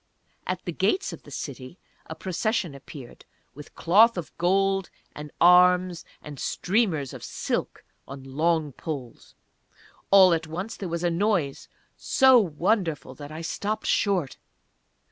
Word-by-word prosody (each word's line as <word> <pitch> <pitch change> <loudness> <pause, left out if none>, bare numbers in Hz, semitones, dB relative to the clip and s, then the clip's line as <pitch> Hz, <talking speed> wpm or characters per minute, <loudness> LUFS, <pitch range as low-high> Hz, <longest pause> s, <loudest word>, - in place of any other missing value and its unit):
At - - -3
the - - -3
gates 385 +1 0
of - - -10
the - - -15
city 135 +3 -7 0.3
a 160 - -7
Procession 185 0 -2
appeared, 140 -2 -12 0.3
with 150 +1 -13
cloth 215 +6 +4
of 175 - -6
gold, 195 +1 +1 0.3
and 150 0 -8
arms, 180 0 +4 0.2
and 145 -3 -9
streamers 180 - -1
of - - -10
silk - - -4 0.2
on 135 0 -9
long 155 +3 0
poles. 135 -4 -8 0.7
All 190 -3 +7
at 160 -1 -2
once 180 +7 -5
there 190 - -6
was 170 +1 -3
a 175 - +1
noise 170 -6 -1 0.3
so 265 -2 +5
wonderful 175 -2 -1
that 145 0 -10
I 155 +1 -7
stopped 210 +6 -3
short. 185 -9 0
170 Hz, 140 wpm, -25 LUFS, 150-195 Hz, 0.7 s, All